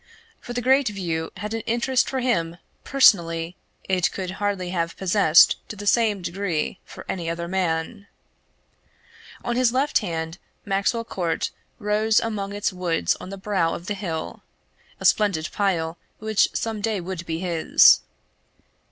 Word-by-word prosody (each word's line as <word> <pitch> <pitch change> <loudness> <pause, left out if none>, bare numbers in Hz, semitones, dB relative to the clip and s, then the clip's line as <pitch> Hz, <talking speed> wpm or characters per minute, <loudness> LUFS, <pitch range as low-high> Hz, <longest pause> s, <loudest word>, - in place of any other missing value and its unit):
For 240 - -8
the 245 0 -3
great 265 +1 +4
view 170 -6 -3
had 210 +1 -5
an 225 - -2
interest 240 +2 +1
for 265 -1 -2
him 170 -10 0 0.3
personally 170 -10 +3 0.3
it 185 -2 +1
could 185 -2 -4
hardly 195 -3 -1
have 170 -2 -2
possessed 185 -4 +5
to - - -6
the 205 0 -8
same 210 -3 +2
degree 175 -1 -2
for - - -12
any 170 -3 -3
other 170 +1 -3
man. 185 +3 -2 1.4
On 240 - -1
his 250 -1 +3
left 270 +4 +2
hand 165 -3 -4 0.3
Maxwell 200 +4 0
Court 175 -7 -2 0.3
rose 210 +1 +2
among 210 -3 -3
its 205 -1 -2
woods 170 - 0
on - - -8
the 195 - -7
brow 190 -4 0
of 170 - -8
the 205 - -2
hill 170 -6 -5 0.6
a - - -6
splendid 195 -7 +2
pile 170 -5 -1 0.2
which 215 -1 +2
some 225 -2 -3
day 215 -1 -1
would 180 -1 -5
be 160 - -2
his. 170 -2 +5
195 Hz, 150 wpm, -24 LUFS, 170-215 Hz, 1.4 s, possessed